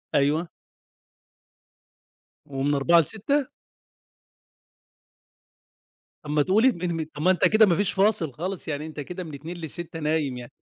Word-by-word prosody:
أيوه. 150 +5 +2 2.0
ومن 140 +1 -1
16:00 170 +5 +5
ل18:00؟ 225 - 0 2.8
طَب 150 - -9
ما 150 - +3
تقول 210 - +3
م 175 -7 -1
م - - -3
طَب 150 - -7
ما 185 +4 +4
أنت 180 - -1
كده 215 0 +5
ما 175 - +2
فيش 200 +1 +1
فاصل 195 -7 +2
خالص، 180 +6 -5
يعني 150 0 -3
أنت 155 -1 -8
كده 180 +5 -6
من 155 - -9
14:00 160 +5 -7
ل18:00 165 +1 -6
نايم 150 -4 -1
يعني. 120 -1 -9
165 Hz, 140 wpm, -25 LUFS, 145-185 Hz, 2.8 s, 16:00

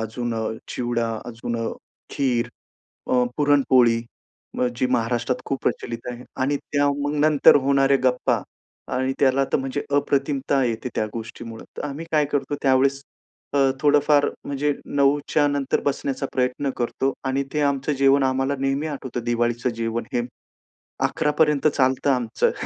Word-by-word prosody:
अजून 115 +2 -3
अ, 110 0 -2 0.2
चिवडा, 120 -2 -1
अजून 120 0 -4
अ, - - 0 0.4
खीर, 125 -3 0 0.6
अ, 125 -1 +4
पुरणपोळी 130 -5 +4 0.8
जी 130 - +1
महाराष्ट्रात 120 +1 0
खूप 135 - -2
प्रचलित 115 -1 -3
आहे 120 0 -9 0.2
आणि 140 +2 +1
त्या 145 0 0
मग 145 +1 -1
नंतर 150 -2 +6
होणारे 140 0 +4
गप्पा 125 -1 +2 0.5
आणि 130 +1 0
त्याला 135 0 +4
तर - - +3
म्हणजे 135 +1 -3 0.2
अप्रतिमता 140 -1 +1
येते 115 +1 -2
त्या - - 0
गोष्टीमुळं. 115 0 -7
तर - - -4
आम्ही 145 +4 -6
काय 150 -1 +4
करतो 145 0 -2
त्यावेळेस 135 +1 +3 0.5
अ, - - +3 0.2
थोडंफार, 145 0 +4 0.2
म्हणजे 145 +1 0
9:00च्या 145 +1 +2
नंतर 140 -1 0
बसण्याचा 140 -1 -1
प्रयत्न 130 +2 0
करतो 130 +3 -1
आणि 135 +1 0
ते 150 - 0
आमचं 140 +1 0
जेवण 135 0 +4
आम्हाला 135 +1 +1
नेहमी 135 +3 0
आठवतं 135 -5 -5
दिवाळीचं 120 +1 0
जेवण 115 0 -2
हे 120 - +1 0.9
11:00पर्यन्त 150 0 +2
चालतं 130 -1 +1
आमचं. 125 -4 +1
135 Hz, 140 wpm, -23 LUFS, 120-140 Hz, 0.9 s, नंतर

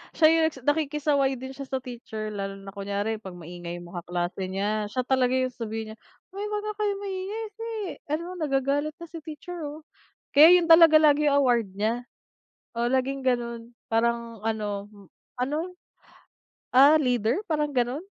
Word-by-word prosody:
siya 315 - +6 0.2
yung, 270 -5 -8
nakikisaway 290 -2 +1
din 260 +1 -7
siya 275 0 -8
sa 260 -1 -3
teacher 225 -4 -6
lalo 195 -1 -4
na 195 - -8
kunyari 200 +2 -3
pag 190 -4 -9
maingay 175 0 -7
mga 175 0 -7
kaklase 175 +2 -2
niya. 205 +3 -1
Siya 255 +4 -2
talaga 260 -1 +2
yung 255 0 +1
sasabihin 225 -2 -5
niya, 220 - -12 0.3
"Uy 395 +2 -5
wag 420 0 -3
nga 425 0 -3
kayong 405 -1 -1
maingay 390 +3 -4
kasi 455 +2 -8 0.4
ano 305 +3 -1 0.2
nagagalit 285 +1 0
na 340 +1 -10
si 330 - -7
teacher 320 +3 -8
oh." 305 +2 -9 0.5
Kaya 325 +5 +9
yun 340 - 0
talaga 325 -1 +8
lagi 300 -1 +4
award 245 -7 +3
niya. 225 +4 0 0.7
Oh, 235 - 0
laging 265 +1 0
ganun 235 -2 -1 0.2
parang 230 -1 -1
ano, 210 -2 -2 0.6
ano, 305 +8 -2 1.0
ah, 280 +4 +8
leader 245 -4 +1
parang 300 -4 0
ganun, 255 +2 -1
260 Hz, 160 wpm, -26 LUFS, 220-305 Hz, 1.0 s, Kaya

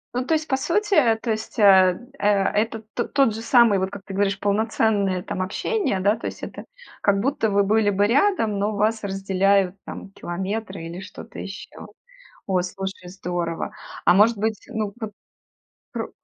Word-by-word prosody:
Ну, 250 - 0
то 320 - +2
есть 310 0 -2
по 265 - +1
сути, 335 - +2
то 235 - 0
есть, 220 +3 -4
э, 190 -4 +6 0.2
э, 205 - +1
это 210 +2 +1
т 240 - -1
тот 275 -6 +2
же 220 - -6
самый, 230 -4 +5
вот 190 0 -1
как 200 0 -9
ты 195 - -8
говоришь, 200 0 0
полноценное, 205 -2 +1
там, 185 - -4
общение, 255 - -1
да, 205 +3 +3
то - - -5
есть - - -8
это - - -7 0.4
как 200 -1 +3
будто 245 -1 0
вы 200 0 +3
были 210 +1 +3
бы 200 0 +2
рядом, 230 - +2
но 205 +1 0
вас 215 +2 +1
разделяют, 195 -1 +1
там, 195 - -8
километры 190 +1 -5
или 170 +2 -7
что-то 190 - -10
ещё. - - -8 0.6
О, 185 -2 +1
слушай, 190 0 -6
здорово. 175 -3 -3 0.3
А 175 - +7
может 210 +3 +5
быть, 220 0 -2
ну 215 -3 -3
вот 220 -3 -5 0.8
пр - - -4
205 Hz, 175 wpm, -23 LUFS, 195-225 Hz, 0.8 s, А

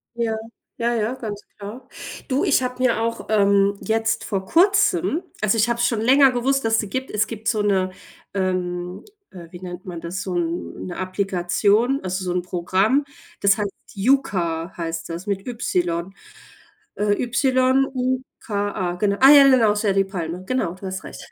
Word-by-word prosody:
Ja, 230 -2 -1 0.4
ja, 235 +1 0
ja, 225 +2 -1
ganz 210 -5 -6 0.2
klar. 220 +6 -9 0.4
Du, 265 +1 +1
ich - - +3
habe 250 0 -3
mir 235 -3 +2
auch, 230 0 -2
ähm, 200 -1 +3
jetzt 225 0 0
vor 195 -3 -2
kurzem 360 - +3 0.2
also 215 +1 +2
ich 225 +1 +3
habe 235 0 0
es 240 - +3
schon 230 -3 0
länger 265 +3 +5
gewusst, 270 +2 0
dass 225 0 +2
es 225 - +4
die 210 - -5
gibt. 260 +3 -3
Es 210 +1 +1
gibt 220 -1 -6
so 215 -2 +1
'ne 190 -2 +1 0.4
ähm, 180 -1 -2 0.3
äh, 175 -3 -11
wie 175 - -11
nennt 180 0 -8
man 175 -3 -7
das, 175 +3 -5
so 185 -2 -4
'n 170 0 -3
'ne 180 - -6
Applikation, 195 +6 +1
also 185 +1 -3
so 180 - -1
'n 180 0 0
Programm, 190 +10 +1 0.4
das 195 -1 +4
heißt 205 -1 -1 0.2
Yuka, 190 -8 0
heißt 165 -1 -4
das, 170 +4 -6
mit 200 +1 -3
Y. 180 -7 -2 0.8
Äh, 205 0 +1
Y-U-K-A, 255 -6 0
genau. 200 +1 +1
Ah, 270 - +9
ja, 285 -1 +9
ja - - +7
genau, 230 -5 +5
ist 210 +1 -2
ja 200 - +3
die 195 0 +2
Palme, 180 -2 -5
genau, 255 -6 -1
du 190 +1 -9
hast 190 0 -5
recht. - - -10
205 Hz, 185 wpm, -22 LUFS, 185-245 Hz, 0.8 s, Ah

